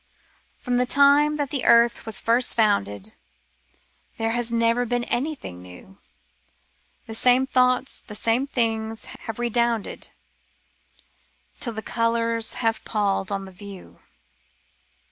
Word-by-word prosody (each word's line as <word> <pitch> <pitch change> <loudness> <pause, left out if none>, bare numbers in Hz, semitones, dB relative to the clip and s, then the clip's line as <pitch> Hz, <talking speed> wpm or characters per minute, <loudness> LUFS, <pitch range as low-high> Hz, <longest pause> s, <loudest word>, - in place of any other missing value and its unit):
From 245 0 -1
the 250 0 +2
time 285 +3 +4
that 285 -2 -2
the 280 -4 -1
earth 235 0 +4
was 215 -3 0
first 235 +2 +2
founded. 105 - 0 1.0
There 225 0 -1
has 240 0 -2
never 230 +1 +2
been 245 0 -1
anything 240 - -4
new 90 - -14 0.5
— - - -42
The 225 - -8
same 250 +3 +3
thoughts, 255 0 +1
the 210 - -10
same 230 +6 0
things, 225 -4 -1 0.2
have 225 - -5
redounded 235 -2 -1 1.5
Till 235 - 0
thp 220 - -6
colours 230 -1 0
have 225 0 0
pall'd 200 -2 -1
on 195 -1 -3
the 190 - -11
view. 195 0 -12
230 Hz, 125 wpm, -24 LUFS, 215-245 Hz, 1.5 s, time